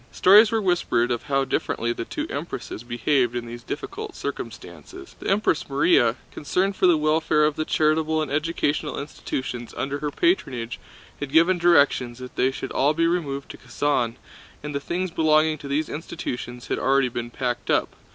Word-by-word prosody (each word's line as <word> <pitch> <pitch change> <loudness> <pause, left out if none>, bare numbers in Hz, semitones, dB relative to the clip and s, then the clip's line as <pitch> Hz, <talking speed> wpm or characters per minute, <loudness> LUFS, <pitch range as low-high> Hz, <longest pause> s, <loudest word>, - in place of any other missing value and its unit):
Stories 210 +4 +6
were 225 - +2
whispered 170 -10 +1
of 120 - -2
how 135 -1 +1
differently 120 -2 -1
the 115 - -5
two - - -4
Empresses - - -5
behaved 120 +1 +1
in 120 -1 -3
these 120 +1 -8
difficult 415 - -6
circumstances. 370 0 -8
The - - -4
Empress 195 -4 +1
Márya, 135 -4 +3 0.2
concerned 190 +6 -1
for 185 - +3
the 175 -3 +5
welfare 155 0 +2
of 150 -1 +1
the 155 - -2
charitable 155 +1 +1
and 155 -3 -2
educational 150 0 -1
institutions 130 -4 -5
under 140 +1 -2
her 150 - -2
patronage, 130 - 0 0.4
had 145 -2 -5
given 175 +3 +4
directions 140 -8 +3
that 125 0 -10
they 130 - +2
should 135 0 -6
all 145 +3 +2
be 165 +1 +2
removed 150 -5 -2
to - - -12
Kazán, 125 -6 -1 0.5
and 150 0 -5
the 140 - -1
things 175 +5 -3
belonging 155 -1 +3
to 140 - -8
these 150 +3 0
institutions 125 -6 -6
had - - -1
already 135 -1 +2
been 120 0 -5
packed 120 0 -3
up. - - +2
145 Hz, 175 wpm, -24 LUFS, 125-165 Hz, 0.5 s, Stories